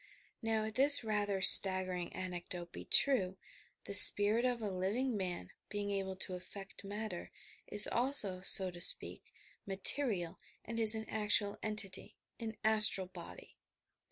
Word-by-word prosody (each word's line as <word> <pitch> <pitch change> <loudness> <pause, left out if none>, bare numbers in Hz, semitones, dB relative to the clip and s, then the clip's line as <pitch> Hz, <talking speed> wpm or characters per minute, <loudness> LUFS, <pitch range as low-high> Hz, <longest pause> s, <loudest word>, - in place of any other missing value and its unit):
Now, 225 -1 -6
if 220 - -11
this 280 +2 +4
rather 205 -3 -7
staggering 185 -2 +7
anecdote 175 -1 -11
be - - -15
true, 195 -10 -3 0.5
the - - -13
spirit 205 +3 +5
of 250 -1 -6
a 210 -3 -9
living 215 +7 -7
man, 180 - -10 0.2
being 205 -1 -9
able 195 -1 -9
to 185 0 -12
affect 195 +2 -15
matter, 205 -2 -11 0.4
is 210 0 +1
also, 235 -7 -1
so 190 0 +4
to 175 0 -17
speak, - - -2 0.4
material 195 -3 -4 0.3
and 230 0 -11
is 220 -1 +4
an 220 0 -11
actual 210 -1 -6
entity, 210 -3 -7 0.2
an 225 -2 -12
astral 215 -3 -2
body. 180 -2 -17
205 Hz, 140 wpm, -29 LUFS, 185-220 Hz, 0.5 s, staggering